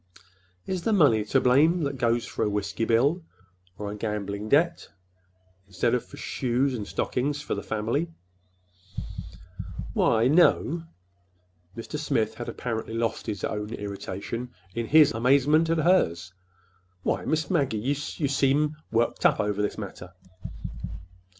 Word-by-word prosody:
Is 185 -2 -2
the 220 +5 +1
money 140 - +5
to 135 +5 +3
blame 155 +7 +4
that 140 -2 -2
goes 120 0 +1
for - - -3
a - - +1
whiskey 105 +2 -2
bill 140 +10 +2 0.5
or 105 -1 -4
a - - -5
gambling 105 -1 -3
debt 170 +5 +2 0.8
instead 110 +5 0
of 125 - +1
for - - -13
shoes 130 +2 0
and 105 -5 -4
stockings 145 +3 -1
for - - -2
the 100 - -3
family?" 110 - -1 1.8
"Why, 115 +1 +3
n 130 - +4
no." 170 -1 +4 0.9
Mr. 130 +6 -5
Smith 115 -8 0
had 120 - -6
apparently 110 -2 -4
lost 115 -1 -2
his 100 -3 -4
own 105 0 -3
irritation 100 +4 -5 0.2
in 115 +2 -3
his 155 +2 +6
amazement 140 +7 +3
at 165 - +2
hers. 95 - +2 0.7
"Why, - - 0
Miss 160 +1 0
Maggie, 140 -10 +1
you—you 145 +5 -2
seem 145 +2 +2
worked 115 +1 +1
up - - +4
over 105 0 0
this 105 - -1
matter." 90 -3 -8
120 Hz, 140 wpm, -26 LUFS, 105-145 Hz, 1.8 s, his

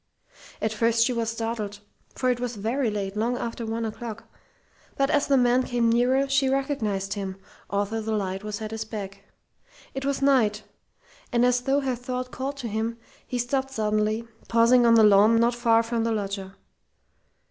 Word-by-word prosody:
At 220 0 0
first 230 +1 +3
she 250 - 0
was 230 -1 -1
startled, 225 -3 -4 0.4
for 255 -1 +1
it 245 - -2
was 245 -1 -3
very 230 +5 -1
late, 200 -2 -3
long 235 +3 0
after 230 -1 -4
one 225 +1 -2
o'clock; 225 0 -6 0.7
but 275 0 +2
as 290 - +2
the 275 - +4
man 245 0 +4
came 240 -2 +1
nearer, 255 +4 +3
she 270 0 +2
recognized 225 -8 -1
him, 195 -2 -4 0.3
although 205 +2 -1
the 220 +1 -3
light 195 -1 -3
was 210 +1 -5
at 215 - -5
his 220 0 -3
back. 200 -3 -7 0.7
It 270 - -4
was 280 0 -1
Knight; 220 -7 +3 0.7
and 240 0 +3
as 250 0 +2
though 270 +3 +1
her 265 -2 -1
thought 250 +1 -5
called 275 +2 -4
to 250 -4 -5
him, 225 +2 -2 0.3
he 250 - -3
stopped 265 +2 -1
suddenly, 215 -1 0 0.2
pausing 235 +1 +5
on 230 - +6
the 225 - +6
lawn 210 +2 +6
not 235 +1 +3
far 230 -1 +3
from 230 0 -1
the 230 - 0
loggia. 200 -2 -3
230 Hz, 180 wpm, -25 LUFS, 215-250 Hz, 0.7 s, on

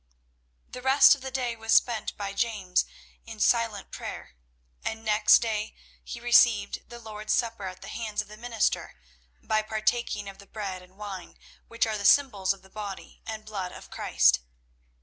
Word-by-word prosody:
The 250 - -7
rest 265 +2 +7
of 280 - -5
the 265 - -5
day 250 -2 -2
was 225 0 -1
spent 235 -3 +2
by 200 -1 -4
James 200 -4 0 0.4
in 225 -1 -9
silent 225 -3 +1
prayer, - - -7 0.5
and 225 0 -4
next 215 +1 +5
day 215 -2 -2 0.3
he 235 - -7
received 235 -3 +3
the 240 - -9
Lord's 215 -2 -4
Supper 230 -4 -1
at 185 0 -9
the - - -9
hands 215 -2 -4
of 210 - -1
the 210 - -11
minister, 230 0 -1 0.5
by 215 0 +1
partaking 215 -1 -1
of 195 0 -9
the 200 - -14
bread 195 -4 -5
and 180 +1 -19
wine 200 -3 -8 0.3
which 230 0 0
are 215 -2 -2
the 200 - -4
symbols 205 -8 +4
of 195 -1 -5
the 190 - -18
body 205 -2 -8
and 220 -1 -6
blood 195 -4 -4
of - - -12
Christ. 60 0 +3
215 Hz, 175 wpm, -27 LUFS, 200-230 Hz, 0.5 s, rest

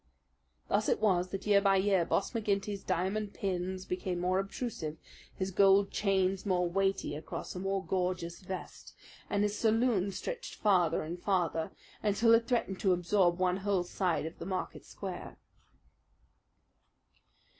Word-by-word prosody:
Thus - - +1
it - - +2
was 185 -4 +2
that, 195 0 -5
year 205 -1 +5
by 195 -1 +4
year, 190 -2 +3
Boss - - 0
McGinty's 205 -3 -1
diamond 195 +3 -1
pins 185 -1 -2
became 180 -1 -3
more 185 +1 +1
obtrusive, 195 -6 -4 0.4
his 190 0 -2
gold 195 +1 +5
chains 195 -2 +1
more 180 -3 +1
weighty 195 +2 0
across 155 +1 -6
a 180 - -5
more 195 0 -1
gorgeous 180 -2 -2
vest, 190 -1 -8 0.3
and 205 0 +1
his 210 0 0
saloon 225 -3 +2
stretched - - -5
farther 180 -7 +2
and 170 +3 -6
farther, 175 -5 0 0.3
until 215 +2 +4
it 230 0 +4
threatened 225 -6 0
to 190 -2 +3
absorb 175 0 +2
one 185 0 +1
whole 195 -2 0
side 175 -3 -1
of 160 - -7
the - - -6
Market 185 -1 -4
Square. - - -7
190 Hz, 145 wpm, -32 LUFS, 180-205 Hz, 0.4 s, year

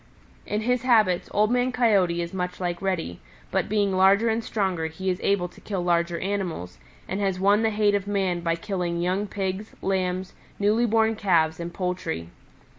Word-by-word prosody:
"In 210 +1 -1
his 250 +2 +1
habits, 215 -8 +3
Old 210 +2 +2
Man 250 +1 +2
Coyote 195 -9 +2
is 170 - -7
much 180 -1 -3
like 175 -2 -2
Reddy, 180 - -2 0.3
but - - 0
being 205 -1 +2
larger 195 +4 +5
and 225 +1 0
stronger 190 -8 -1
he 185 +4 -2
is 180 - -3
able 195 -3 +1
to - - -18
kill 195 -4 -3
larger 170 -1 +1
animals, 180 - -3 0.3
and 190 - -3
has 190 -2 0
won 200 +3 +4
the 225 - +2
hate 210 -1 +2
of 200 -1 -1
man 190 -3 0
by 165 -1 0
killing 175 -1 -3
young 185 +4 0
Pigs, 195 +1 -4
Lambs, 185 -1 -1 0.2
newly 215 +4 +2
born 225 0 +2
Calves 165 -6 +2
and 170 0 -5
poultry. 180 - -3
190 Hz, 185 wpm, -25 LUFS, 175-210 Hz, 0.3 s, larger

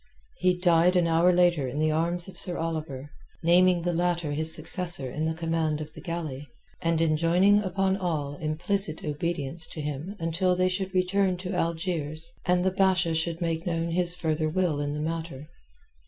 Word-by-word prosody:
He 180 -1 +2
died 175 0 +3
an 175 -1 +3
hour 165 +2 +4
later 175 -6 +2
in 130 - -5
the 155 +1 +1
arms 170 +2 0
of 190 - -10
Sir 175 -1 +2
Oliver, 155 -4 -4 0.3
naming 175 +1 +4
the 175 0 0
latter 175 -2 0
his 155 +2 0
successor 165 -5 +2
in 155 +4 -2
the 160 0 -1
command 165 -2 -1
of 155 0 -8
the - - -11
galley, 155 -5 -5 0.3
and 165 -1 +1
enjoining 170 +5 +3
upon 190 -1 0
all 155 -7 -2
implicit 165 +2 0
obedience 155 0 -2
to - - -8
him 150 +6 -5
until 180 +2 0
they 185 0 +2
should 190 +1 -3
be 185 -1 +3
returned 185 0 0
to 185 +1 -5
Algiers 165 -2 -2
and 180 0 +2
the 190 - +2
Basha 185 -3 +2
should 165 +1 -2
make 165 0 -2
known 165 -1 -1
his 175 0 +1
further 155 -2 -1
will 170 -3 0
in 145 0 -2
the 150 - -4
matter. 160 -3 -5
165 Hz, 185 wpm, -27 LUFS, 155-180 Hz, 0.3 s, hour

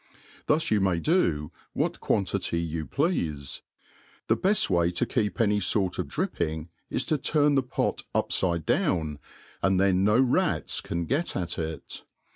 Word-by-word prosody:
Thus 155 +2 +2
yoU 110 - +4
may 95 -3 +2
do 85 - +1 0.2
what - - -1
quanti^ty 90 -3 0
you 80 -1 -4
pleafe. 80 - -1 0.7
The - - +5
beft 200 +2 +2
way 85 -2 +2
to 90 - 0
keep 110 -1 -1
any 105 -2 +3
fort 95 -1 0
of - - -1
dripping 85 - -2 0.2
is 130 - -2
to 155 - 0
turn 150 +1 +3
the 135 - +4
pot 125 - -2
upHde 85 -4 +1
down, 75 -3 0 0.4
and 95 -1 +2
then 95 -1 +3
no 105 +4 +4
rats 130 -2 +1
can 85 0 -3
get 150 - -1
at 85 -2 -3
it. 80 -3 -6
95 Hz, 155 wpm, -27 LUFS, 85-130 Hz, 0.7 s, The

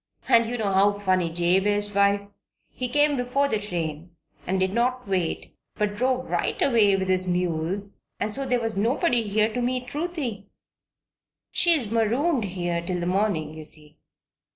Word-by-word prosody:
And 230 -1 +5
you 245 - -3
know 210 -3 -1
how 200 +1 +3
funny 185 -4 +1
Jabe 175 +4 +2
is, 205 0 +1
wife? 200 0 +3 0.5
He 250 - -4
came 290 +2 +3
before 250 +3 +1
the 220 -6 0
train, 170 -4 -5 0.3
and 190 +2 0
did 190 +1 0
not 250 +1 0
wait, 185 -4 -2 0.2
but 210 -1 -1
drove 255 +2 0
right - - -1
away 220 -7 +4
with 190 -1 -2
his 185 0 +1
mules 180 +2 -2 0.2
and 210 +1 -2
so 275 - 0
there 250 -2 +1
was 225 -2 -1
nobody 245 - +1
here 215 +1 0
to 245 - -2
meet 250 0 -2
Ruthie. 290 - -4 1.0
She's 310 -11 +3
marooned 235 +4 +1
here 175 -2 -2
till 180 +1 -3
the 175 - -2
morning, 180 -5 0
you 155 0 -9
see." 150 0 -5
205 Hz, 170 wpm, -25 LUFS, 185-245 Hz, 1.0 s, And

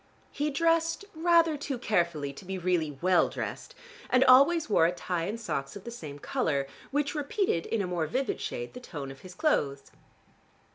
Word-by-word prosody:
He 295 +1 -1
dressed 330 +5 +1
rather 335 -1 +4
too 280 -2 -4
carefully 170 - 0
to 140 - -11
be 190 +1 -4
really 170 -5 0
well 185 -1 +4
dressed - - -6 0.3
and 255 0 +5
always 290 +6 +6
wore 165 -6 +4
a - - +1
tie 180 -1 -3
and 215 +5 -4
socks 135 -11 -3
of 200 - -9
the 235 - -7
same 155 -11 -8
color, 140 -1 -1 0.2
which 290 +1 0
repeated 295 - -1
in 225 -3 0
a - - -1
more 175 -3 -1
vivid 260 - -2
shade 120 0 -4
the 250 - -8
tone 145 - -7
of 135 - -12
his 185 -1 -11
clothes. 140 - 0
200 Hz, 185 wpm, -29 LUFS, -, 0.3 s, always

